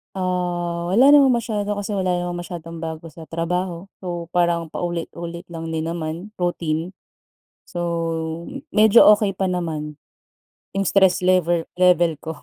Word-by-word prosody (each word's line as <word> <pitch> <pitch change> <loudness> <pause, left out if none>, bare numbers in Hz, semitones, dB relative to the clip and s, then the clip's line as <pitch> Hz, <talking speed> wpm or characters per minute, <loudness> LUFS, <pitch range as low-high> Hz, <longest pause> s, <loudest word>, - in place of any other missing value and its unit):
Ah, 175 -2 -2
wala 245 +8 +6
namang 285 -2 +7
masyado 210 -3 -3
kasi 205 0 -3
wala 185 -2 0
namang 175 0 -4
masyadong 165 -1 -8
bago 160 0 -5
sa 165 +1 -11
trabaho. 170 +2 -3 0.2
So, 175 -2 -4
parang 170 -1 +2
paulit-ulit 170 +1 -5
lang 165 -1 -6
din 160 0 -2
naman, 170 +5 -5
routine. 170 -1 -2 0.7
So, 175 - -5 0.9
medyo 215 0 +6
okey 205 -2 -1
pa 190 0 -1
naman 155 -4 -3 0.8
yung 195 - +1
stress 190 -1 +3
lever 175 -2 +2
level 175 -4 +4
ko. 160 +1 -6
175 Hz, 135 wpm, -22 LUFS, 165-185 Hz, 0.9 s, namang